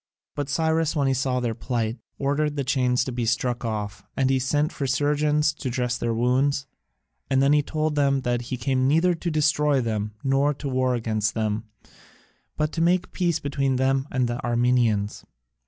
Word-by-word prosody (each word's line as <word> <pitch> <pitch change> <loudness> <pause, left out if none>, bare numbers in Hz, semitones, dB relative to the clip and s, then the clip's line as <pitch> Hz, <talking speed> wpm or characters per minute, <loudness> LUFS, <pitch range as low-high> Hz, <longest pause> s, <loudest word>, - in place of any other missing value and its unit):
But 145 -1 -4
Cyrus 160 +2 +1
when 140 -3 +1
he 135 - +2
saw 130 -1 0
their 120 -2 -1
plight 115 0 -2 0.2
ordered 145 +2 0
the 140 - -1
chains 125 -2 +1
to 130 - -4
be 120 -1 -2
struck 120 +1 0
off, 105 -3 -4
and 135 0 +2
sent 145 +4 +1
for 140 - -3
surgeons 150 +2 +2
to 145 -3 -5
dress 125 0 -1
their 120 - -1
wounds, 130 +4 +1 0.6
and 135 - +3
then 140 +2 +4
he 150 - +4
told 155 +1 -1
them 140 -2 +2
that 120 -1 -1
he 130 - -2
came 130 +1 +1
neither 165 +5 +3
to 170 +1 -3
destroy 150 -2 +2
them 105 -3 -2
nor 140 +2 +2
to 140 - -6
war 130 -1 +1
against 110 -2 -1
them, 110 0 -1 0.9
but 150 0 0
to 165 - -2
make 180 +2 +2
peace 175 -4 0
between 140 -2 -1
them 135 +1 +1
and 130 -2 0
the 120 +1 -4
Armenians. 120 -4 +1
135 Hz, 185 wpm, -24 LUFS, 120-145 Hz, 0.9 s, then